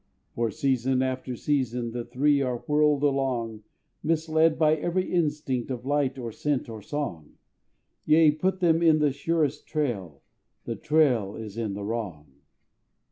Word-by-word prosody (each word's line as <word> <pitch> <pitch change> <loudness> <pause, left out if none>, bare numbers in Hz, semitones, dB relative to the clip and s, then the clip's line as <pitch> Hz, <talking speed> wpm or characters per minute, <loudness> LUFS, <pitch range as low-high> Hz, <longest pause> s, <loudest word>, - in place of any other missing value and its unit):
For 115 -1 0
season 130 -2 +1
after 130 -1 -3
season 125 -3 -1
The 120 0 -4
three 140 +4 +2
are 125 -3 -2
whirled 150 -1 +2
along, 130 -6 0 0.4
Misled 160 0 +2
by 155 -1 +4
every 175 +5 -2
instinct 150 -7 0
Of 125 -1 -5
light, 140 -1 0
or 120 -3 -5
scent, 145 +3 -1
or 110 -2 -7
song; 105 - -5 0.7
Yea, 155 0 +6
put 185 +5 -1
them 165 -2 +3
on 160 -2 +5
the 150 -2 +2
surest 150 +1 -1
trail, 100 - -3 0.4
The - - -3
trail 130 -10 +2
is 110 -2 -8
in 110 -4 -3
the 100 - -5
wrong. 100 -10 -5
135 Hz, 145 wpm, -26 LUFS, 115-150 Hz, 0.7 s, Yea